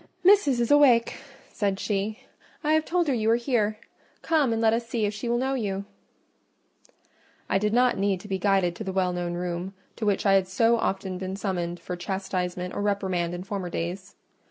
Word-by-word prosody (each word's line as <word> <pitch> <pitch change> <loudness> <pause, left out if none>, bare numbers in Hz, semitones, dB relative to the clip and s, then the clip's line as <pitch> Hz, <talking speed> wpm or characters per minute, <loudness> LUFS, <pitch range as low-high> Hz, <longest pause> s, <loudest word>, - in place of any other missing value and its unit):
"Missis 360 -10 +5
is 235 +2 +1
awake," 265 -6 +5 0.3
said 200 -2 -1
she; 210 +1 -2 0.4
"I 305 +1 +2
have 315 0 +2
told 350 -1 +1
her 280 - +2
you 220 -2 +1
are 230 - +5
here: 235 -4 0 0.5
come 305 -7 +2
and 225 - 0
let 225 -1 +3
us 230 0 -1
see 225 -2 -1
if 205 - -1
she 210 +3 -4
will 240 - +2
know 265 +2 0
you." 200 -6 -2 1.6
I 195 - +2
did 210 +1 0
not 245 -1 +3
need 195 -2 +1
to 210 - -11
be 190 -2 -2
guided 190 -3 +2
to - - -5
the 190 - -3
well 185 -1 0
known 175 -1 -3
room, 180 +2 -4 0.2
to 220 - -3
which 200 0 +1
I 195 - +5
had 190 -1 +3
so 230 +5 +3
often 190 -3 -2
been 190 0 -4
summoned 175 -4 -3
for 180 +1 -5
chastisement 180 -1 -3
or - - -3
reprimand 190 -4 -1
in 175 - -6
former 190 -2 -4
days. 180 +4 -5
200 Hz, 205 wpm, -26 LUFS, 185-235 Hz, 1.6 s, Missis